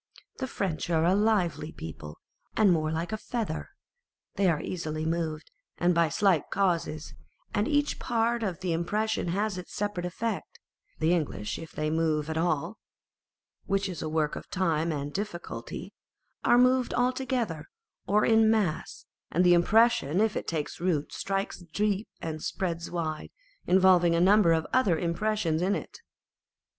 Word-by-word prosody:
The 260 - -2
French 180 -9 -3
are 165 -1 +2
a 180 - +4
lively 195 -7 +1
people, 80 - -8 0.4
and 205 -4 +5
more 155 -1 0
like 165 +4 -2
a 215 - -1
feather. 215 -7 -4 0.6
They 195 -2 +2
are 160 -3 +1
easily 155 -3 -4
moved 160 -1 -2 0.3
and 175 +1 +3
by 170 -1 +3
slight 185 -1 +2
causes, 170 -5 -1 0.4
and 205 +1 +1
each 290 -1 +1
part 235 0 0
of 190 -5 -3
the 180 -3 0
impression 210 +5 -1
has 195 +2 -1
its 180 - -10
separate 205 -4 -2
effect: 230 - -4 0.4
the 160 +2 +2
English 105 - -2
if 165 - -10
they 155 0 -1
are - - -1
moved 160 -1 0
at 160 - -3
all 170 +4 -1 0.9
(which 195 0 +1
is 180 -3 -6
a 155 - -3
work 155 -1 0
of - - -9
time 165 -3 0
and 145 -1 -4
difficulty), 200 -4 -5 0.5
are 240 - +5
moved 255 0 +3
altogether, 245 - -1 0.4
or 210 +2 +3
in 225 -1 +5
mass, 205 -8 -1 0.2
and 180 - +2
the 175 -1 +6
impression, 180 -3 +4
if 220 0 +2
it - - -3
takes 155 -3 -3
root, 165 -5 0
strikes 195 0 -2 0.2
deep 210 0 0 0.2
and 155 -1 -4
spreads 170 -1 -3
wide, 160 -3 -3 0.4
involving 180 -2 +5
a - - +2
number 195 0 +5
of 160 -1 +2
other 210 -10 +3
impressions 170 -1 0
in 195 +3 +2
it. - - -7
175 Hz, 160 wpm, -28 LUFS, 160-210 Hz, 0.9 s, the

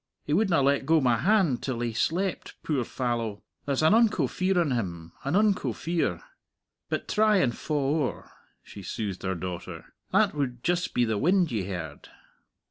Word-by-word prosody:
He 145 - -2
wouldna 180 -5 +3
let 140 0 +2
go 160 0 +5
my 125 -4 +3
hand 175 - +2
till 130 -4 -3
he 120 -1 -2
slept, 175 - -1
puir 140 -6 0
fallow. 115 -5 -3 0.2
There's 140 +1 0
an 160 - +5
unco 215 - +4
fear 185 +7 0
on 165 -5 +1
him 85 -8 -3
an 140 +5 -1
unco 210 -1 +2
fear. 170 0 -2 0.7
But - - -2
try 215 0 +3
and 125 -10 +1
fa' 155 - -5
owre," 145 0 -1 0.3
she 100 - -11
soothed 100 0 -4
her 95 0 -2
daughter. 90 0 -7 0.2
"That - - +3
would 125 -5 -3
just 175 +1 0
be 125 - +3
the 110 -2 -1
wind 180 +1 +3
ye 105 -5 -1
heard." 85 -6 -6
140 Hz, 175 wpm, -27 LUFS, 115-175 Hz, 0.7 s, go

